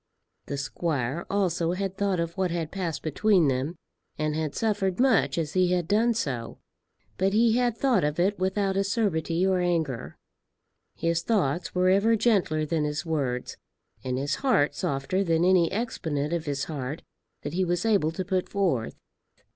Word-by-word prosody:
The 140 - -3
squire 140 +1 -2
also 175 -4 0
had 195 0 -3
thought 195 -2 0
of 170 0 -2
what 190 -2 0
had 165 -2 -3
passed 180 -5 -3
between 175 +1 +3
them, 135 +6 -1 0.4
and 155 0 -1
had 155 -2 -2
suffered 205 -4 0
much 250 -9 +3
as 160 -3 -2
he 180 -1 +3
had 175 -2 0
done 225 +4 +2
so; 125 - -3 0.6
but 190 +1 +2
he 225 +1 +4
had 245 -2 +1
thought 250 -9 +2
of 150 +2 -1
it 195 +3 +1
without 190 +1 0
acerbity 195 -4 0
or 190 -1 +2
anger. 165 -8 -1 0.8
His 165 0 0
thoughts 175 -6 0
were 180 0 +3
ever 200 +4 +4
gentler 200 -9 +2
than 155 0 0
his 150 +2 -2
words, 135 -6 -2 0.5
and 125 -1 -2
his 140 +2 -1
heart 245 - +2
softer 140 +8 -1
than 165 -1 +2
any 180 -3 +4
exponent 165 -9 -2
of 170 -1 -2
his 140 -1 -1
heart 145 -1 -5 0.4
that 145 - -4
he 185 +2 +1
was 175 +3 -1
able 200 -8 +2
to 185 +2 -4
put 185 -1 -1
forth. 175 - 0
175 Hz, 170 wpm, -26 LUFS, 155-195 Hz, 0.8 s, he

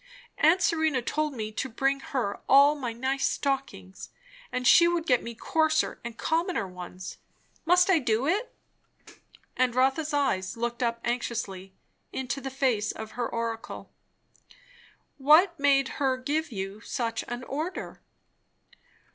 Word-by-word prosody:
Aunt 335 +5 +4
Serena 315 -5 +2
told 300 +4 -2
me 215 -2 -4
to 265 +5 -3
bring 270 +4 0
her 250 -7 -3
all 280 +2 +7
my 260 -6 -4
nice 260 +4 -1
stockings, 270 - -3 0.4
and 250 0 -3
she 340 +6 +7
would 340 -1 0
get 250 -6 +3
me 235 0 -7
coarser 315 +5 0
and 235 -1 -7
commoner 330 - 0
ones. 180 0 -9 0.5
Must 360 +2 +5
I 375 -4 +4
do 230 -1 0
it?" 405 - 0 1.0
And 250 -1 +1
Rotha's 270 +5 +2
eyes 260 -9 0
looked 240 +1 -3
up 235 -1 -1
anxiously 215 -6 -3 0.4
into 265 +1 -3
the 270 0 -5
lace 220 -6 +1
of 220 0 -8
her 240 -1 -3
oracle. 230 -1 -5 1.3
"What 320 +5 +5
made 280 -1 +4
her 265 -2 +2
give 295 +4 -2
you 195 0 -5
such 230 -2 -2
an 240 +1 -5
order?" 310 +8 -5
260 Hz, 140 wpm, -27 LUFS, 230-305 Hz, 1.3 s, all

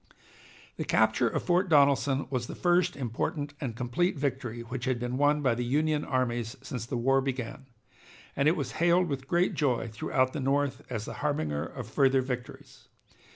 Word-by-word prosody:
The - - -2
capture - - +3
of - - -2
Fort 180 +1 +2
Donelson 140 -2 +4
was 125 -3 -2
the - - -7
first 175 0 +2
important 145 +4 -3
and 125 -6 -3
complete 125 +9 0
victory 130 -4 -2
which 120 +2 -5
had 130 -2 +1
been 125 +1 -3
won 145 +2 +2
by 130 -3 +3
the 120 +1 -2
Union 150 +4 +1
armies 120 -3 -1
since 120 -3 -5
the 125 - -2
war 135 +3 +3
began, 130 0 -4 0.7
and 140 +2 +2
it 160 - +4
was - - -3
hailed 175 +1 +4
with 135 -3 -4
great 175 +4 +2
joy 130 -6 0
throughout 130 +4 0
the 150 - -3
North 140 +1 0
as 115 -4 -3
the - - -6
harbinger 80 - -1
of - - -8
further 135 -1 +3
victories. 125 -1 -7
135 Hz, 180 wpm, -29 LUFS, 125-145 Hz, 0.7 s, Donelson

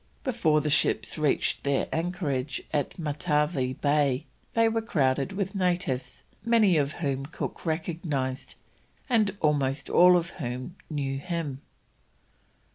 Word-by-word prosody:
Before 170 - +2
the 150 - -1
ships - - +2
reached 150 -3 +1
their 140 -1 +1
anchorage 160 -6 -2
at 145 -3 -1
Matavai 150 -4 0
Bay 145 -1 +2 0.3
they 230 0 +5
were 225 0 0
crowded 140 - +1
with 195 -1 -2
natives, 175 -10 -1 0.2
many 225 -6 +4
of 145 0 +1
whom 140 -4 -2
Cook 165 - -6
recognised, 155 -5 -2 0.5
and 215 -6 +2
almost 140 -2 +1
all 180 0 +7
of 170 0 -2
whom 130 +1 -5
knew 135 -3 -2
him. 160 -5 -4
150 Hz, 120 wpm, -27 LUFS, 140-180 Hz, 0.5 s, all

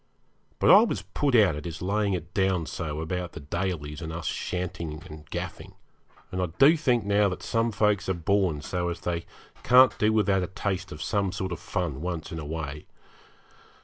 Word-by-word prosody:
But - - +5
I 205 - +10
was 235 - -1
put 140 -3 0
out 100 -9 +5
at 75 - -7
his 80 -2 -5
laying 100 +2 0
it 85 -3 -5
down 95 -4 +1
so 75 -2 -4
about 90 +2 -3
the - - -7
Dalys 75 -1 -3
and 80 -1 -5
us 85 +1 -6
shantying 85 -4 -4
and 75 0 -11
gaffing, - - -6 0.6
and 95 - -2
I 90 - +1
do 145 +5 +7
think 125 -8 +1
now 100 0 +3
that 90 - -6
some 115 0 0
folks 105 -2 +1
are 95 - +1
born 85 -2 +1
so 90 0 -2
as 85 - -5
they 85 -1 -3 0.3
can't 125 +2 +6
do 105 +1 +3
without 105 -3 +2
a 90 - -2
taste 95 0 -3
of 75 - -6
some 100 -3 0
sort 95 0 -4
of 85 - -4
fun 85 -7 -3
once 85 -1 -4
in 85 - -5
a 75 - -6
way. 75 -1 -5
90 Hz, 200 wpm, -27 LUFS, 80-100 Hz, 0.6 s, I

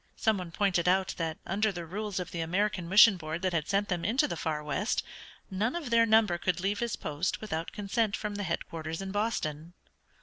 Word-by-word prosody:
Some 220 -3 +1
one 180 -2 -6
pointed 180 -2 +1
out 190 +1 +2
that 165 -2 -2
under 210 +3 +1
the 175 -3 -6
rules 205 +3 -4
of 180 - -5
the 170 - -4
American 180 +1 -1
Mission 205 +1 +8
Board 160 +1 -5
that 185 -1 +1
had 160 -2 0
sent 200 +1 +1
them 175 -2 -2
into 260 +8 +2
the - - -3
far 155 -2 -2
west 185 +9 -1 0.5
none 210 - 0
of 305 -8 -4
their 230 0 +5
number 215 -5 +4
could 180 0 0
leave 200 +3 -1
his 235 -2 -1
post 150 +5 -2
without 170 -6 -4
consent 210 +1 0
from 210 -1 -4
the 205 - -4
headquarters 165 -2 -4
in 190 - -5
Boston. 175 -7 -2
190 Hz, 210 wpm, -30 LUFS, 170-210 Hz, 0.5 s, Mission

